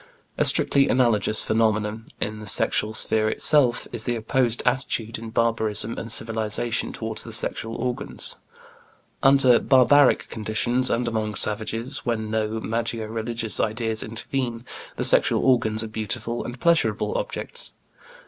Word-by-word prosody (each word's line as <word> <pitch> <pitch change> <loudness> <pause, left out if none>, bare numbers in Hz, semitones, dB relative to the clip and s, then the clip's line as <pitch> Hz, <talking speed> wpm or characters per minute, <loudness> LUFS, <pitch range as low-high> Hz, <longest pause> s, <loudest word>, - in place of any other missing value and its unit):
A - - 0
strictly 140 0 +4
analogous 110 -4 +2
phenomenon, 110 0 -1
in 105 +1 -4
the 105 - -10
sexual 105 +1 +2
sphere 110 0 +2
itself, 130 -2 +3
is 110 - -4
the 120 - -1
opposed 120 +1 -1
attitude 120 -3 -2
in 115 0 -8
barbarism 110 -1 0
and 115 - -6
civilization 115 +1 -1
toward 110 -1 -5
the - - -6
sexual 115 0 -1
organs. 125 0 -4 0.9
Under 135 -3 +5
barbaric 135 +1 +4
conditions 120 +4 0
and 120 +1 -1
among 110 -2 -3
savages, 115 +5 0
when 110 -3 -3
no 110 0 -2
magico 115 0 -3
religious 115 0 -2
ideas 110 0 -2
intervene, 115 +1 -4 0.3
the - - -3
sexual - - +5
organs 110 -4 +2
are - - -5
beautiful 110 +2 -4
and 120 +1 -8
pleasurable 170 - +1
objects. - - -5
115 Hz, 135 wpm, -23 LUFS, 110-125 Hz, 0.9 s, Under